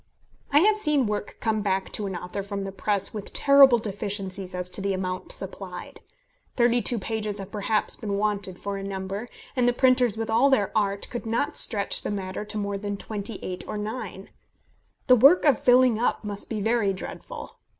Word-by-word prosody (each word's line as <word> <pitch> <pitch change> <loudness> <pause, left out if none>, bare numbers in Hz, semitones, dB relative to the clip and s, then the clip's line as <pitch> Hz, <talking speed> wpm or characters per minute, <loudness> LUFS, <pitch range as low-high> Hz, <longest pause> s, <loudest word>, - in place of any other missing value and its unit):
I 290 +2 +6
have 425 +3 +4
seen 300 - +2
work 210 -1 -3
come 220 -2 0
back 195 -1 -1
to 210 - -3
an 190 - -4
author 180 +3 -5
from 200 0 -5
the 195 - -5
press 200 0 0
with 210 -2 -7
terrible 280 -3 +7
deficiencies 195 -3 -4
as 180 0 -3
to 195 - -5
the 195 0 0
amount 185 -1 -4
supplied. 190 -2 -7 0.6
Thirty 240 0 +3
two 240 - +1
pages 215 0 -3
have 195 0 -8
perhaps 210 +1 0
been 200 -2 -3
wanted 200 -3 -2
for 200 +1 -4
a 195 - -6
number, 195 +3 -4 0.3
and 250 -2 +2
the 245 - +3
printers 250 -3 +3
with 225 0 -2
all 230 +5 +4
their 220 -7 +1
art 200 -2 0
could 240 -2 -5
not 230 +5 -1
stretch 200 -3 +3
the - - -4
matter 195 -1 -4
to 210 0 -5
more 200 -1 -2
than 205 0 -4
twenty 210 +1 -5
eight 180 -1 -5
or - - -4
nine! 215 +4 -6 0.7
The 255 - +7
work 280 +10 +6
of 280 -6 +4
filling 250 -2 +5
up 240 - 0
must 205 -1 -5
be 215 -2 -3
very 220 -2 +1
dreadful. 190 - -8
210 Hz, 195 wpm, -25 LUFS, 195-235 Hz, 0.7 s, terrible